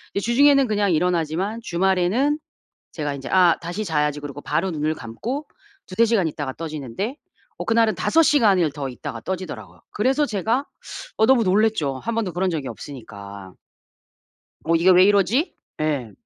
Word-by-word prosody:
이제 200 - -1
주중에는 275 +3 +5
그냥 205 -3 +1
일어나지만 175 +5 0
주말에는 190 - +1 0.5
제가 145 -3 -3
인제 135 - -8
'아 180 -3 +5
다시 175 +6 -4
자야지.' 150 -4 0
그러고 145 0 -8
바로 165 +7 -1
눈을 155 -2 -1
감고 230 - -5 0.4
2-3 220 +5 +2
시간 215 -7 +2
있다가 145 -3 -4
떠지는데 155 - -5 0.4
어 - - -5
그날은 225 -1 +2
5 330 - +3
시간을 200 - +3
더 140 -2 -5
있다가 115 -2 -7
떠지더라고요. 120 - -6
그래서 265 +7 +1
제가 225 +6 -1 0.5
어 220 - +4
너무 260 0 +5
놀랐죠. 190 -8 +1
1 230 - -4
번도 220 -5 -1
그런 180 +2 -1
적이 150 -5 -3
없으니까. 100 -9 -9 1.1
'어 165 +1 +2
이게 170 +3 +4
왜 185 +1 +7
이러지?' 205 - +2 0.3
예. 140 -7 -1
180 Hz, 335 characters per minute, -22 LUFS, 150-220 Hz, 1.1 s, 왜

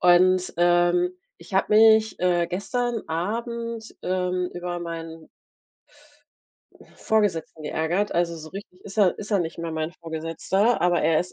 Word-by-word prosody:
Und, 185 +1 +4
ähm, 175 +1 +3 0.3
ich 170 +3 -11
habe 195 +2 +2
mich, 220 0 +5
äh, 175 -1 +2
gestern 235 +5 -2
Abend, 230 +6 -4
ähm, 180 0 -1
über 175 0 -4
meinen 165 -1 -7 1.7
Vorgesetzten 190 -8 0
geärgert. 170 +7 -1
Also, 170 -1 +1
so 155 -1 -9
richtig 190 -2 -10
ist 195 - -10
er 195 -4 +4
ist 210 - -7
er 205 - +3
nicht 165 -2 -3
mehr 165 -1 -4
mein 160 +1 -3
Vorgesetzter, 165 +7 -1
aber 175 -1 +2
er 155 0 +3
ist 180 - -6
180 Hz, 145 wpm, -24 LUFS, 170-205 Hz, 1.7 s, mich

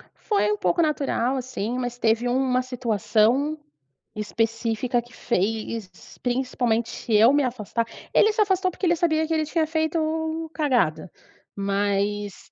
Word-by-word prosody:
Foi 420 -1 0
um 420 - 0
pouco 350 -4 +1
natural 275 -4 0
assim, 250 -2 -3
mas 245 -1 -3
teve 230 +1 +1
uma 255 0 +1
situação 240 +3 +1 0.6
específica 225 +3 -1
que 240 +1 -19
fez, 220 -1 -2 0.3
principalmente, 245 -2 -1
eu 220 +4 +7
me 290 0 +3
afastar. 230 -2 -2 0.3
Ele 430 - +5
se 435 - +1
afastou 380 -2 +2
porque 365 - -4
ele 340 - +4
sabia 320 -2 +1
que 325 - -1
ele 315 -1 +1
tinha 320 +1 0
feito 320 0 -1
cagada, 245 - 0 0.4
mas 200 0 -1
250 Hz, 135 wpm, -24 LUFS, 225-315 Hz, 0.6 s, eu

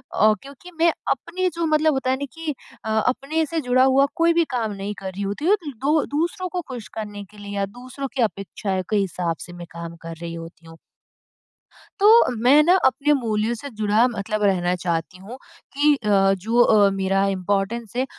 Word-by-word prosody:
ओ, 215 +1 +5
क्योंकि 280 +6 -13
मैं 335 0 +5 0.2
अपनी 365 +1 -1
जो 335 0 -1
मतलब 310 0 +3
होता 265 -1 0
है 260 - +1
ना 285 - -4
कि 325 -2 -4 0.3
अ, - - -3 0.2
अपने 295 +5 0
से 330 +2 -2
जुड़ा 255 -1 +3
हुआ 265 +1 +5
कोई 335 -1 +3
भी 335 0 +3
काम 225 -4 -1
नहीं 200 +1 -5
कर 190 -1 -5
रही 195 +2 -7
होती 200 +10 -3
हूँ 415 +3 +4 0.2
दू 300 +2 +3 0.2
दूसरों 345 +3 -1
को 360 0 -3
खुश 245 -4 -7
करने 205 -2 -6
के 210 - -17
लिए 205 0 -8
या 200 - +1
दूसरों 255 +6 -7
की 255 - 0
अपेक्षाएँ 195 -2 -3
के 215 - +2
हिसाब 180 -4 -1
से 175 - -11
मैं 175 -1 -9
काम 170 0 -8
कर 165 0 -7
रही 170 0 -5
होती 165 0 -10
हूँ। 165 - -13 1.2
तो 410 - +5 0.4
मैं 280 +4 +7
ना 355 +3 +5
अपने 295 +3 +3
मूल्यों 225 -3 0
से 280 +5 -8
जुड़ा, 215 +1 +2
मतलब 215 -2 -3
रहना 180 -2 +2
चाहती 175 +1 -3
हूँ 215 +7 -10 0.4
कि 295 +1 +4
अ, 215 -6 -4 0.3
जो 225 +6 +2
अ, 210 -4 +5
मेरा 195 0 +1
इम्पोर्टेंस 195 +4 -2
है, 255 - +1
225 Hz, 200 wpm, -22 LUFS, 195-280 Hz, 1.2 s, मैं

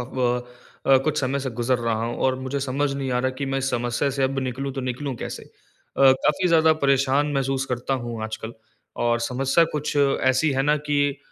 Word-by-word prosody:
ब 125 -1 0 0.4
अ, 135 -1 +6
कुछ 155 -1 0
समय 135 +1 -1
से 135 -1 -3
गुज़र 120 +2 0
रहा 115 -1 -1
हूँ। 120 - -3
और 130 -1 +2
मुझे 130 +2 -3
समझ 140 +1 -1
नहीं 135 -1 -3
आ 125 - +1
रहा 130 - +1
कि 140 - -2
मैं 135 0 -1
इस 135 0 -1
समस्या 120 +3 -1
से 135 0 -1
अब 135 +1 0
निकलूँ 130 +1 -3
तो 135 - -4
निकलूँ 130 +2 -3
कैसे? - - -6
अ, - - -22 0.6
काफ़ी 150 +7 +1
ज़्यादा 160 -1 +5
परेशान 140 0 +2
महसूस 135 0 0
करता 125 +1 -2
हूँ 115 -2 -5
आजकल। 110 +1 -6 0.5
और 120 0 +2
समस्या 135 +7 +2
कुछ 150 0 -3
ऐसी 135 +1 +2
है 135 - +1
ना 150 +1 +3
कि 145 -1 +1
135 Hz, 205 wpm, -23 LUFS, 125-140 Hz, 0.6 s, अ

